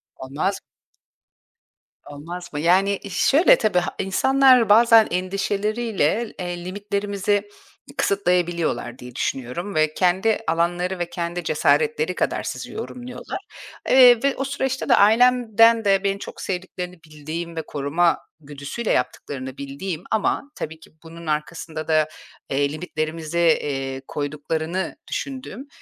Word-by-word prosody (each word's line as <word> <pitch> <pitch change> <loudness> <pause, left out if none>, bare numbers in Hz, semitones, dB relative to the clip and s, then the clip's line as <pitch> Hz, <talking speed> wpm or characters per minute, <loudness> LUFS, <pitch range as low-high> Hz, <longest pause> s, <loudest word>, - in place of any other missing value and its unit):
Olmaz 145 +9 -3 1.5
Olmaz 170 +5 -8
mı? 145 - -3
Yani, 190 +5 +3
e, 200 - -7
şöyle 285 - +5
tabii 210 -5 +2
ha 175 - -4
insanlar 255 +4 +4
bazen 225 +1 +7
endişeleriyle, 205 +2 -1
eee, 175 -1 -5
limitlerimizi 200 +1 -2 0.5
kısıtlayabiliyorlar 175 -10 0
diye 125 -1 -11
düşünüyorum 135 +11 -3
ve 155 0 +2
kendi 190 +6 +2
alanları 175 +3 0
ve 175 -1 -2
kendi 175 0 -4
cesaretleri 460 0 +1
kadar - - -1
sizi - - -6
yorumluyorlar. 250 - -7 0.5
Eee, 250 -2 +7
ve 280 0 +2
o 270 - -1
süreçte 270 -1 -2
de - - +7
ailemden 230 0 +5
de 195 -1 +3
beni 200 0 0
çok - - -9
sevdiklerini 180 -1 -5
bildiğim 155 +2 -6
ve 160 - -2
koruma 160 +4 +1 0.2
güdüsüyle 145 +9 -5
yaptıklarını 130 +1 -3
bildiğim 155 +5 -5
ama 220 +6 0
tabii 160 +1 -6
ki - - -17
bunun 165 0 -11
arkasında 155 +1 -3
da, 155 -1 +3 0.4
eee, 140 +1 +1
limitlerimize, 155 0 -4 0.2
eee, 135 -2 -4
koyduklarını 155 +5 -3
düşündüğüm, 265 -1 -5
180 Hz, 120 wpm, -22 LUFS, 155-215 Hz, 1.5 s, bazen